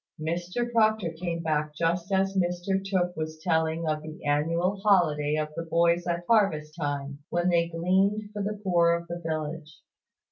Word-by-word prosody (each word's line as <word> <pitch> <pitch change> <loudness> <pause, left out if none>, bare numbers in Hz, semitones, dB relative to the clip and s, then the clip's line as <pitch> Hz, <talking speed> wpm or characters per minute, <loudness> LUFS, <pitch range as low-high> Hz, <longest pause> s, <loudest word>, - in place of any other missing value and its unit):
Mr 175 +9 -2
Proctor 215 -6 +2
came 170 0 -4
back 150 -1 -1
just 170 +3 -1
as 195 0 +1
Mr 180 +1 0
Tooke 180 -2 0
was 155 0 -4
telling 160 0 0
of 155 0 0
the 155 +1 -10
annual 165 +6 +1
holiday 155 -8 +3
of 155 0 -1
the - - -3
boys 170 +1 +2
at 170 0 -2
harvest 160 -9 +2
time, 145 -3 -3
when 175 +1 +1
they 170 -1 +2
gleaned 190 +5 +1
for 205 - -3
the 210 +1 -3
poor 170 -3 +4
of 170 0 -3
the 170 0 -5
village. 155 -1 -4
170 Hz, 170 wpm, -27 LUFS, 155-185 Hz, -, poor